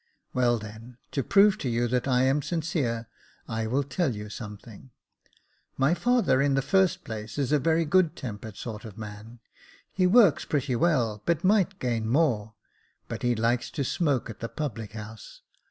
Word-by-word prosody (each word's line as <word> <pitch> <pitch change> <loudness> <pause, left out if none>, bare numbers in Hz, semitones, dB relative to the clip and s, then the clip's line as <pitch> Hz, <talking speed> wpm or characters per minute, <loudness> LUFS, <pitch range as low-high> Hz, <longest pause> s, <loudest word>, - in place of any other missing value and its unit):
" - - -48
Well, 120 -2 +2
then, 110 +3 -10
to 140 - 0
prove 200 +7 +4
to 130 - -2
you 120 +1 +1
that 125 +2 0
I 125 -1 +3
am 135 +3 +2
sincere, 145 -9 -2 0.4
I 110 0 -2
will 135 +5 +1
tell 140 -2 -1
you 105 0 -7
something. 105 +2 -10 0.9
My 135 +5 +3
father, 235 - +2
in 140 -1 +2
the 135 - +1
first 190 +1 +2
place, 110 +2 -7
is 140 -1 0
a 150 - +4
very 165 +4 +2
good 170 0 +3
tempered 110 - -7
sort 110 -2 -6
of 110 -4 -10
man. 110 +2 -9 0.5
He 185 -1 +3
works 200 -4 +5
pretty 140 -3 -1
well, 120 -8 +1
but 170 -2 +1
might 195 -1 +3
gain 115 -3 -1
more, 115 -7 +1 0.5
but - - -5
he 120 -1 +1
likes 115 +2 0
to 140 - -3
smoke 140 -2 0
at 115 - -9
the 115 - -4
public 115 -8 -5
house. 110 0 -10
125 Hz, 180 wpm, -27 LUFS, 110-155 Hz, 0.9 s, works